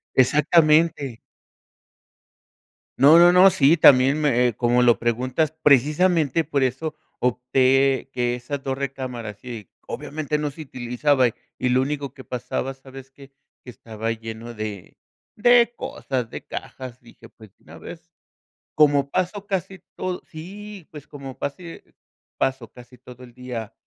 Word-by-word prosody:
Exactamente. 150 -1 +3 1.8
No, 150 +5 +7
no, 175 +1 +7
no. 185 +2 +7
Sí, 165 -2 +4
también 135 0 +5
me, 125 -4 +2
eh, 115 - -4
como 120 0 +2
lo 120 -1 +4
preguntas, 125 +6 -1
precisamente, 150 +3 +3
por 140 -2 -1
eso 135 +5 -2 0.2
opté 130 +2 +1
que 120 -1 -1
esas 135 +3 -6
dos 135 -1 -3
recámaras 125 -6 -6
y, 115 -6 -8 0.2
obviamente, 150 0 -4
no 150 -1 -2
se 155 +3 -10
utilizaba, 130 0 0 0.3
y 125 - 0
lo 130 +1 +2
único 140 -1 -4
que 130 - -12
pasaba, 125 +2 -4
¿sabes 135 0 -13
qué? 135 0 -16 0.3
Que 125 - -9
estaba 110 +1 -6
lleno 115 +1 -8
de 105 -3 -7 0.4
de 240 +2 +4
cosas, 125 -4 -4
de - - -8
cajas, 125 -2 -8
dije: 120 - -17
"Pues, 110 -3 -17
de - - -32
una - - -13
vez". - - -12 0.6
Como 145 -2 +3
paso 185 +2 -2
casi 190 0 -3 0.2
todo 185 -1 -4
Sí, 195 +3 -10
pues, 150 -2 -11
como 135 -2 -10
pasé 165 +4 -8 0.4
paso 130 -3 -2
casi 125 0 -16
todo 125 0 -14
el 120 -1 -13
día 125 -3 -7
135 Hz, 145 wpm, -22 LUFS, 125-150 Hz, 1.8 s, No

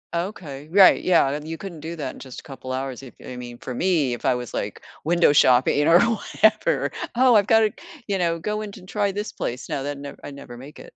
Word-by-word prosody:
Okay, 165 -6 -5
right, 190 +1 +6
yeah, 150 -5 +3
you 160 +1 -6
couldn't 185 -5 -8
do 165 +3 -6
that 140 -5 -5
in - - -13
just 130 -2 -9
a - - -14
couple 135 -3 -9
hours, 130 -1 -4
if 130 -4 -13
I 125 - -7
mean, 120 -1 -8
for 125 - -7
me, 155 -5 +1
if 120 - -7
I 130 -2 +3
was 125 -1 -6
like - - -4 0.2
window 170 -2 +4
shopping, 125 -1 +4
you 145 - +2
know, 165 - +4
or - - +8
whatever. 220 -1 +1 0.2
"Oh, 255 0 +5
I've 205 -1 +4
got 225 -1 +5
to, 215 -2 +2 0.4
you 195 -2 -1
know, 170 -1 +1
go 210 +5 -3
in 210 -1 -6
to 185 - -12
try 205 +1 -1
this 205 +2 -4
place." 125 +2 -5
No, 135 - -2
that 145 0 -4
nev 140 0 -9
I - - -7
never 140 -3 -10
make 135 +4 -12
it. - - -13
155 Hz, 250 wpm, -23 LUFS, 135-195 Hz, 0.4 s, or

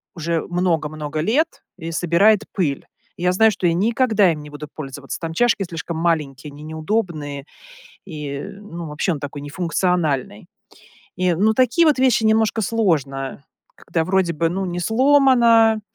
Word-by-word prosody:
уже 165 -1 -1
много-много 155 -4 -2
лет 285 - 0
и 165 -2 -6
собирает 180 +6 +3
пыль. 150 -8 -1 0.3
И 175 - -7
я 180 - +3
знаю, 220 +4 +4
что 185 -3 -1
я 170 - +2
никогда 215 0 +2
им 155 -2 -5
не 150 - -11
буду 145 +1 -8
пользоваться: 135 -2 -7
там 165 -1 -5
чашки 230 +2 +2
слишком 165 -2 -6
маленькие, 150 -4 -1
они 145 +1 -12
неудобные, 155 -3 -3 0.6
и, 150 -5 -6
ну, 185 -5 -9
вообще 150 +5 -1
он 150 - -5
такой 145 0 -6
не 145 - -8
функциональный. 165 - -1 0.7
И, 185 0 +1
ну, 210 +6 +2
такие 255 +8 +3
вот 300 -3 +3
вещи 255 -4 +3
немножко 220 0 +2
сложно, 145 - -1 0.3
когда 165 -2 -2
вроде 185 -1 +1
бы, 165 +2 +1
ну, 190 +2 -2
не 175 0 -4
сломана, 235 -1 +4
175 Hz, 160 wpm, -21 LUFS, 155-215 Hz, 0.7 s, знаю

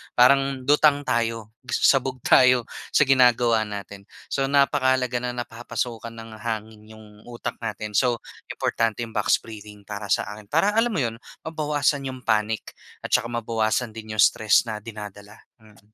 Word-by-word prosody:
parang 135 +1 +4
lutang 145 +1 +4
tayo, 115 -2 -1 0.2
sabog 130 +1 +2
tayo 125 -2 +5 0.3
sa - - +4
ginagawa 125 -4 +4
natin. 100 -1 -8 0.2
So 135 - 0
napakahalaga 130 -3 +2
na 125 0 -3
napapasukan 115 -1 -5
ng 115 -1 -10
hangin 110 -1 -5
yung 110 0 -14 0.2
utak 120 -1 -6
natin, 105 -2 -4
so 120 -3 +1 0.2
importante 115 0 -1
yung 115 - -4
box 105 - +2
breathing 105 -2 -11
para 105 0 -6
sa - - +2
akin, 105 - -13
para 165 +6 +3
alam 225 +1 +2
mo 160 - 0
'yon 115 -2 -2 0.3
mabawasan 150 -3 0
yung 130 -1 -6
panic 110 0 -1 0.2
at - - -6
tsaka - - +2
mabawasan 115 0 -1
din 110 0 -9
yung 105 - +3
stress 110 -1 +4
na 110 - -3
dinadala, 105 -1 -10 0.2
mm. 105 -1 -22
115 Hz, 155 wpm, -24 LUFS, 110-130 Hz, 0.3 s, tayo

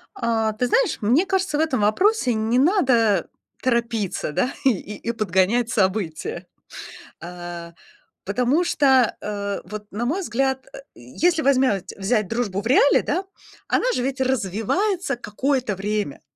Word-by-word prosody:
А, 225 - 0
ты 250 +3 0
знаешь, 465 - +1
мне 250 - +3
кажется, 380 -6 0
в - - +1
этом 315 -7 +1
вопросе 250 - +2
не 220 +3 +1
надо 255 - +3 0.3
торопиться, 230 -9 -1
да 250 - 0
и 270 - +6 0.3
и 230 - -3
подгонять 215 +2 +1
события. 190 -6 -1 0.8
Э, 175 -1 -8 0.5
потому 250 - +1
что, 265 -8 +3
э, 200 -1 -4
вот, 210 0 -8
на 225 +4 -3
мой 325 +10 -1
взгляд, 265 -5 -1
э, - - -9
если 315 - 0
возьмять 260 - +2
взять 210 +2 +1
дружбу 225 -5 -2
в - - -13
реале, 270 +3 +5
да, 370 +3 -1 0.4
она - - +1
же - - -1
ведь 265 +1 -3
развивается 265 - 0
какое-то 245 -1 -1
время. 205 -6 -3
235 Hz, 140 wpm, -22 LUFS, 205-270 Hz, 0.8 s, и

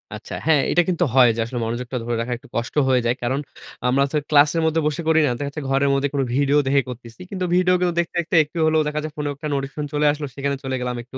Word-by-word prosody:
আচ্ছা। - - -9
হ্যাঁ 155 -3 +4
এটা 175 - +4
কিন্তু 175 - +1
হয় 130 -2 +7
যে - - -5
আসলে 120 +1 -5
মনোযোগটা 120 +3 -4
ধরে 120 0 -2
রাখা 120 +1 -3
একটু 120 - -18
কষ্ট 120 +3 -3
হয়ে 130 -1 +3
যায় 120 +1 +1
কারণ, 130 +3 0 0.5
আমরা 135 +2 +3
তো - - -3
ক্লাসের 150 +2 +4
মধ্যে 160 0 +2
বসে 150 +2 -2
করি 160 0 +4
না। 135 - +1
দেখা 145 - -2
যাচ্ছে, 150 +2 -6
ঘরের 135 +1 +2
মধ্যে 140 +1 +1
কোনো 140 -1 +1
ভিডিও 140 +1 +3
দেখে 140 +1 +3
করতেছি, 120 +2 -10
কিন্তু 185 -2 -2
ভিডিও 180 0 +3
গুলো 180 -1 +2
দেখতে, 170 0 -2
দেখতে, 170 0 -2
একটু 150 +3 -11
হলো 160 0 +2
দেখা 150 0 -2
যায় 155 - -5
ফোনেও 145 -1 -3
একটা 145 +2 -6
নোটিফিকেশন 140 +2 -4
চলে 150 0 +1
আসলো 145 0 -4
সেখানে 140 0 -1
চলে 130 -1 -2
গেলাম 125 0 -2
একটু, 130 +2 -10
140 Hz, 260 wpm, -22 LUFS, 130-155 Hz, 0.5 s, হয়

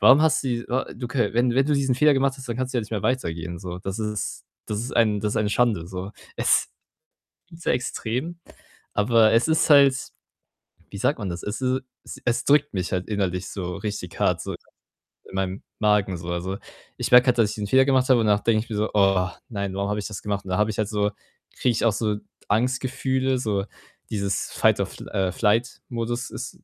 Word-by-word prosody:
Warum 135 +4 +7
hast 160 -1 +3
die 120 -2 -1
wa 130 +2 0
du 120 +1 -6
kö 120 -5 0
wenn 120 0 +2
wenn 135 +1 +3
du 150 - +2
diesen 135 -2 +1
Fehler 150 +2 +5
gemacht 135 0 +2
hast, 135 -1 -10
dann 120 - -2
kannst 130 0 -2
du - - +2
ja - - +2
nicht 105 - -11
mehr 105 -3 -2
weitergehen, 85 -9 -2
so. 90 -1 -6
Das 95 +3 -5
ist 105 -1 -3 0.2
das 105 -1 -3
ist 120 +3 -5
ein 110 -3 +3
das 105 0 -1
ist - - -2
eine 105 -1 0
Schande, 105 -7 +1
so. 95 +2 -6 0.2
Es - - +2 0.8
ist 165 0 -13
so - - +1
extrem, 125 +6 -2 0.6
aber 110 +1 +4
es 115 +6 +3
ist 160 +1 +3
halt 140 -2 +7 1.0
wie 100 - -7
sagt 140 +8 +1
man 100 - -3
das? 85 0 -5
Es 105 +5 -4
is 130 0 +1 0.4
e - - -17
es 120 -1 +1
drückt 145 -6 +3
mich 90 -2 -2
halt 90 0 -2
innerlich, 95 -4 -1
so 90 -3 -4
richtig 105 -5 -5
hart, - - +2
so, - - -4
ja, - - -5 0.7
in - - -13
meinem 95 +1 -2 0.2
Magen, 105 -3 +2
so. 85 +1 -8
Also, 90 +3 -3 0.4
ich - - -2
merke 125 +1 +8
halt, 125 -1 +3
dass 110 -2 +4
ich - - -5
diesen 105 -1 -3
Fehler 130 +4 +5
gemacht 130 -2 +3
habe 125 -2 +6
und 110 - +1
danach 105 -1 +3
denke 110 -2 +3
ich - - -22
mir 110 - -2
so: 105 +1 0
„Oh, 95 -3 +3 0.2
nein, 100 -4 -3
warum 100 +1 -1
habe 105 - -1
ich 105 - -3
das 105 - -6
gemacht?“ 100 -1 -2
Und 95 - -8
da 95 - 0
habe 105 +1 +2
ich 105 - -5
halt 110 -2 0
so 105 -1 0 0.5
kriege 125 - +2
ich 115 - -1
auch 115 - +4
so 105 -1 0 0.3
Angstgefühle, 130 +3 0
so 105 -5 -1 0.5
dieses 100 -2 -2
Fight - - +3
or - - +1
fl - - -11
äh, 95 -2 0
Flight 115 +5 +1
Modus 120 +1 -3
ist - - -7
110 Hz, 230 wpm, -24 LUFS, 100-125 Hz, 1.0 s, merke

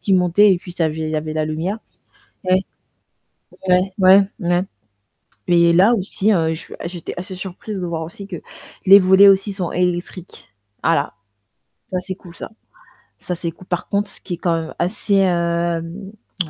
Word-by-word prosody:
qui 195 - +1
montait 185 +3 +4
et - - -4
puis 180 0 -11
ça 170 -2 0
avait 155 0 -4
il 155 0 -2
y 155 - -1
avait 155 0 -3
la 155 - 0
lumière. 170 +8 -3 0.7
Ouais. 185 0 +3 1.1
Ouais, 185 +1 +3
ouais, 190 +1 +7 0.2
mouais. 175 -2 0 0.8
Et 170 -1 +4
là 195 +7 +5
aussi, 200 +1 0
je 160 -4 +2
suis 160 - -10
j'étais 170 -1 -6
assez 185 +1 -6
surprise 190 +2 -7
de - - -2
voir 165 -1 -3
aussi 195 +5 -9
que 180 -4 -6 0.5
les 195 +1 +9
volets 190 +1 +6
aussi 195 +1 +3
sont 185 -3 -3
électriques. 180 0 -3 0.3
Voilà, - - +1 0.8
ça 185 - -2
c'est 185 0 -6
cool 175 -3 -15
ça. - - -8 0.7
Ca 180 - -4
c'est, 170 -1 -3
cool. 185 - -17
Par 175 0 -3
contre, 200 0 -1
ce - - -13
qui 180 - -5
est - - -18
quand 175 -1 0
même 160 - -8
assez, 200 +2 0
hem, 170 +1 -1 0.3
heu, - - -12
180 Hz, 180 wpm, -19 LUFS, 170-195 Hz, 1.1 s, les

